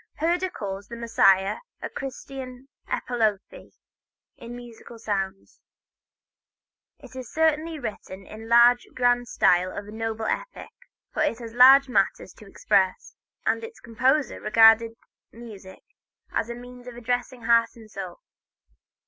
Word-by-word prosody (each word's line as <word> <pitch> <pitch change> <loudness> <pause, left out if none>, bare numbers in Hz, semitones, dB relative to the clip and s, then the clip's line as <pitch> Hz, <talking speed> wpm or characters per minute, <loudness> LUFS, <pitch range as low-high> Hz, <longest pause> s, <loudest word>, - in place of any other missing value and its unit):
Herder 350 +4 0
calls 195 - -6
the 235 - -8
"Messiah" 195 -4 +3 0.2
a - - -5
Christian 265 -1 -8 0.2
epopee, 225 - -2 0.6
in 235 0 -10
musical 240 -1 -12
sounds. 195 -3 -4 1.4
It 260 -2 -15
is 255 -3 -8
certainly 320 0 0
written 200 -6 -7
in 215 - -11
the 225 - -10
large, 235 +1 +5
grand 245 -1 +2
style 180 -3 +2
of 200 +2 -7
a - - -10
noble 225 0 -4
epic, - - -4 0.4
for - - -2
it 230 - +1
had 230 -2 -9
large 265 +3 +7
matters 250 - 0
to - - -16
express, - - 0 0.3
and - - 0
its 455 0 -9
composer 260 +5 0
regarded 225 +1 +5 0.4
music 210 -5 -12 0.5
as 230 - -2
a 235 - -5
means 245 0 -12
of 245 - -9
addressing 245 +1 -3
heart 230 0 +3
and 220 -2 -15
soul. 185 -4 -8
235 Hz, 135 wpm, -25 LUFS, 220-255 Hz, 1.4 s, large